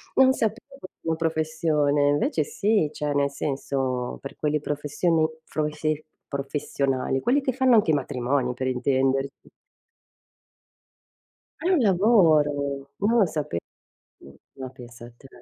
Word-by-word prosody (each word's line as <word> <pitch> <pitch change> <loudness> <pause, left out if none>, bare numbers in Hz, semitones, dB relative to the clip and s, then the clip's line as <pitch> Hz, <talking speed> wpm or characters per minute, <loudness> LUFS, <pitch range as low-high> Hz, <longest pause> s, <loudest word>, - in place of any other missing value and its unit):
Non 265 0 +6
sapevo 235 +5 -3
fosse 165 -5 -5
professione, 155 -3 +1
invece 145 +2 +1
sì, 165 +2 +1
cioè 150 -1 -2
nel 140 0 +1
senso, 135 -3 -2
per 140 - -8
quelle 150 0 0
professioni 150 +3 0 0.2
froise 155 0 -2 0.2
professionali, 140 -1 -2
quelli 270 - +2
che 265 -1 0
fanno 260 -2 +4
anche 210 -7 +4
i - - +2
matrimoni 130 -2 -1
per 130 +1 -3
intenderci. 135 +1 0 2.1
È 345 - -1
un 370 -4 +4
lavoro! 155 - +3
Non 225 +4 +2
lo 200 - +5
sape 150 - -3 0.6
mh, 70 - -15 0.2
ma 130 -1 -7
pensa 120 -2 -12
te. 135 - -16
150 Hz, 125 wpm, -25 LUFS, 135-170 Hz, 2.1 s, Non